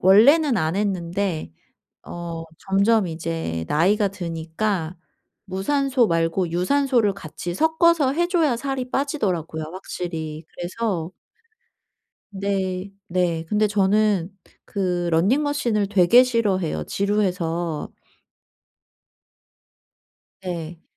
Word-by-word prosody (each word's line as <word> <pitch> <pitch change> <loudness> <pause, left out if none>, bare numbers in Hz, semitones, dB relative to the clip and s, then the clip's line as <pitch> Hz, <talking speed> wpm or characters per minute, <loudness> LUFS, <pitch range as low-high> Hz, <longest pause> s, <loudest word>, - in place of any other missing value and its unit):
원래는 255 - +6
안 160 0 0
했는데 180 - -2 0.5
어 170 -1 -6 0.2
점점 200 +1 +2
이제 160 - -3
나이가 200 +7 +3
드니까 170 0 -3 0.5
무산소 260 +7 +1
말고 165 +1 0
유산소를 235 +3 +2
같이 175 -1 -6
섞어서 320 - +3
해 345 +3 +1
줘야 330 -8 +2
살이 260 -1 -3
빠지더라고요 185 - -1
확실히. 165 -4 -5
그래서 175 -2 -3 1.2
네. 195 -1 -2 0.2
네. 170 -2 0
근데 215 0 +2
저는 205 -2 +2 0.3
그 180 -3 -1
러닝 195 - +3
머신을 240 -9 0
되게 205 +5 +6
싫어해요, 195 - 0
지루해서. 180 - -1 2.5
네. 170 -3 -6
190 Hz, 205 characters per minute, -23 LUFS, 170-225 Hz, 2.5 s, 원래는